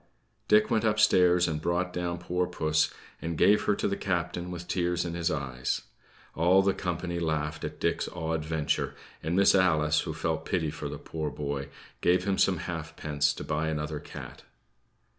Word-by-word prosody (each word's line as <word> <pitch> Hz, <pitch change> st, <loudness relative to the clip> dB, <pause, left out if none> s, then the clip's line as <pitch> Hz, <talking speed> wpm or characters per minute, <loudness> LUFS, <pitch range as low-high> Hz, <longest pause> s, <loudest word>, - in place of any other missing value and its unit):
Dick 105 Hz, +1 st, +4 dB
went 110 Hz, -1 st, +2 dB
upstairs 90 Hz, -5 st, +4 dB
and 75 Hz, -2 st, -2 dB
brought 90 Hz, +2 st, 0 dB
down 90 Hz, -1 st, -2 dB
poor 90 Hz, +1 st, -1 dB
puss, 80 Hz, -3 st, +1 dB, 0.3 s
and 85 Hz, -1 st, -3 dB
gave 100 Hz, +6 st, +4 dB
her 105 Hz, -, +3 dB
to -, -, -1 dB
the 100 Hz, -, 0 dB
captain 90 Hz, -2 st, -2 dB
with 90 Hz, 0 st, -6 dB
tears 90 Hz, -1 st, 0 dB
in 85 Hz, -, -3 dB
his 85 Hz, 0 st, 0 dB
eyes. 65 Hz, -5 st, -2 dB, 0.5 s
All 90 Hz, +4 st, +4 dB
the 100 Hz, 0 st, +3 dB
company 90 Hz, -1 st, -3 dB
laughed 75 Hz, -2 st, -2 dB
at -, -, -5 dB
Dick's -, -, 0 dB
odd 80 Hz, -2 st, -2 dB
venture; 80 Hz, -1 st, -1 dB, 0.3 s
and 80 Hz, +2 st, -1 dB
Miss 100 Hz, +1 st, +6 dB
Alice, 80 Hz, -5 st, +3 dB
who -, -, -3 dB
felt -, -, -1 dB
pity 80 Hz, -4 st, -1 dB
for 75 Hz, -1 st, -5 dB
the 75 Hz, -, -5 dB
poor 80 Hz, +1 st, -4 dB
boy, 70 Hz, -1 st, -4 dB, 0.3 s
gave 90 Hz, +1 st, +3 dB
him 95 Hz, 0 st, 0 dB
some 95 Hz, -2 st, +4 dB
halfpence 75 Hz, -3 st, -1 dB
to -, -, -6 dB
buy 80 Hz, +1 st, -1 dB
another 75 Hz, -1 st, -2 dB
cat. -, -, -9 dB
85 Hz, 180 wpm, -28 LUFS, 75-90 Hz, 0.5 s, Miss